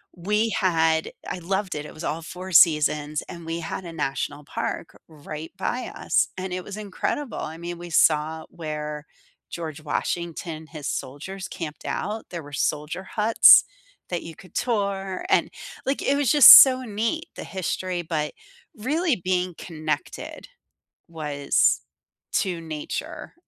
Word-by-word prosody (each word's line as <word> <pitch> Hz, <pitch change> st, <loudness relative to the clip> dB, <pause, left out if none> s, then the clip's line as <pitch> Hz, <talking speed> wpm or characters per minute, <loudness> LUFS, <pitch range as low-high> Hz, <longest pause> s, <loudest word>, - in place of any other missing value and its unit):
we 210 Hz, +6 st, 0 dB
had 165 Hz, -6 st, +1 dB, 0.2 s
I 180 Hz, -, -4 dB
loved 190 Hz, +2 st, -2 dB
it, 150 Hz, 0 st, -5 dB
it -, -, -10 dB
was 155 Hz, -, -9 dB
all 160 Hz, +2 st, -2 dB
4 180 Hz, +3 st, -8 dB
seasons 150 Hz, -2 st, +4 dB
and 170 Hz, -2 st, -9 dB
we 165 Hz, +1 st, -3 dB
had 165 Hz, -, -5 dB
a 170 Hz, -, -7 dB
national 145 Hz, -1 st, -3 dB
park 165 Hz, -, -4 dB
right 155 Hz, 0 st, -8 dB
by 245 Hz, +6 st, -3 dB
us, 340 Hz, -, +1 dB
and 185 Hz, -1 st, -4 dB
it 185 Hz, -, -3 dB
was 200 Hz, +2 st, -8 dB
incredible, 215 Hz, +6 st, -3 dB
I 160 Hz, +1 st, -5 dB
mean, 175 Hz, +1 st, -6 dB
we 175 Hz, 0 st, -9 dB
saw 160 Hz, 0 st, +2 dB
where 150 Hz, -2 st, -5 dB, 0.4 s
George 160 Hz, -3 st, -6 dB
Washington 160 Hz, 0 st, -3 dB
his 150 Hz, -3 st, -7 dB
soldiers 185 Hz, +9 st, -5 dB
camped 155 Hz, -3 st, -7 dB
out, 215 Hz, +1 st, -3 dB
there 170 Hz, -2 st, -6 dB
were 145 Hz, 0 st, -12 dB
soldier 150 Hz, +6 st, -2 dB
huts 215 Hz, +3 st, +7 dB, 0.5 s
that 175 Hz, -1 st, -3 dB
you 165 Hz, -, -8 dB
could 185 Hz, -, -16 dB
tour, 200 Hz, -5 st, -1 dB
and, -, -, +3 dB, 0.4 s
like, 270 Hz, +1 st, -1 dB
it 275 Hz, -, +2 dB
was 280 Hz, -5 st, +2 dB
just 290 Hz, -4 st, +11 dB
so 260 Hz, -1 st, +4 dB
neat, 230 Hz, -, -2 dB
the -, -, -6 dB
history, 185 Hz, -1 st, -3 dB
but 155 Hz, -3 st, -2 dB, 0.5 s
really 300 Hz, +7 st, +1 dB
being 180 Hz, -1 st, 0 dB
connected, 155 Hz, -3 st, -5 dB, 0.6 s
was 150 Hz, -4 st, +1 dB, 0.5 s
to 180 Hz, -3 st, 0 dB
nature 155 Hz, -2 st, -6 dB
170 Hz, 150 wpm, -24 LUFS, 155-195 Hz, 0.6 s, just